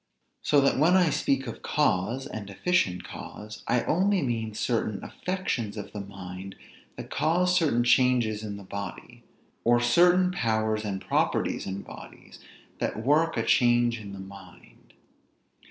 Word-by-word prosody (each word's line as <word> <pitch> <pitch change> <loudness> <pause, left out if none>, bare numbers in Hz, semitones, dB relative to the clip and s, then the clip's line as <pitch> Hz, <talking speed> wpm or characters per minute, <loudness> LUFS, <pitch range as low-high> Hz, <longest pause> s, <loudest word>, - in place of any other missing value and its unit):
So 145 - +3
that 135 -1 +2
when 170 +5 +5
I 175 -4 +3
speak 135 -1 0
of 115 - -7
cause, 115 +9 0
and 100 -2 -7
efficient 100 - 0
cause, 105 0 -9
I 125 - +2
only 190 +1 +2
mean 115 -4 -2
certain 110 -3 -1
affections 125 - -3
of 105 - -7
the 105 - -4
mind, 95 -1 -9 0.4
that - - -8
cause 175 +5 +2
certain 145 -9 +2
changes 120 -3 +3
in 105 -2 -5
the 100 - -10
body; 100 0 -7 0.4
or 120 +1 +4
certain 175 +9 +4
powers 110 -7 0
and 100 -2 -3
properties - - 0
in 95 +1 -4
bodies, - - -13 0.4
that 110 - -2
work 160 +4 +3
a - - +1
change 120 -2 +3
in 100 -2 -9
the 100 - -8
mind. 95 -2 -14
115 Hz, 150 wpm, -27 LUFS, 100-150 Hz, 0.4 s, when